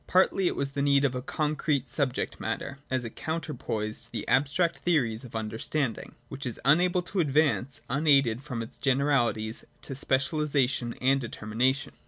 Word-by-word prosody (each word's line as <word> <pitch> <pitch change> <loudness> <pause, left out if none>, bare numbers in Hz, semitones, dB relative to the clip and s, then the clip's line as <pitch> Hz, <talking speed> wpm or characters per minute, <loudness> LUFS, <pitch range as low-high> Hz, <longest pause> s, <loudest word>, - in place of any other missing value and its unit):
Partly 185 0 +3
it - - 0
was 140 0 -2
the 140 0 -2
need 140 0 +4
of 130 - +1
a 125 - -3
concrete 150 -1 -1
subject 130 0 -1
matter, 135 - -3
as 130 -2 0
a - - -3
counterpoise 145 -10 -3
to - - -9
the - - -5
abstract 145 +5 +2
theories 130 -9 +1
of 125 - -11
the - - -2
understanding, 110 +4 -3
which 135 +3 -7
is 120 - -3
unable 180 +5 +4
to 190 +2 -3
advance 145 -4 +1
unaided 135 -4 +3
from 125 -5 -4
its 115 - -12
generalities 125 -5 +1 0.2
to 135 - -4
specialisation 135 -2 +1
and 135 +1 +4
determination. 125 +4 0
135 Hz, 165 wpm, -28 LUFS, 120-150 Hz, 0.2 s, need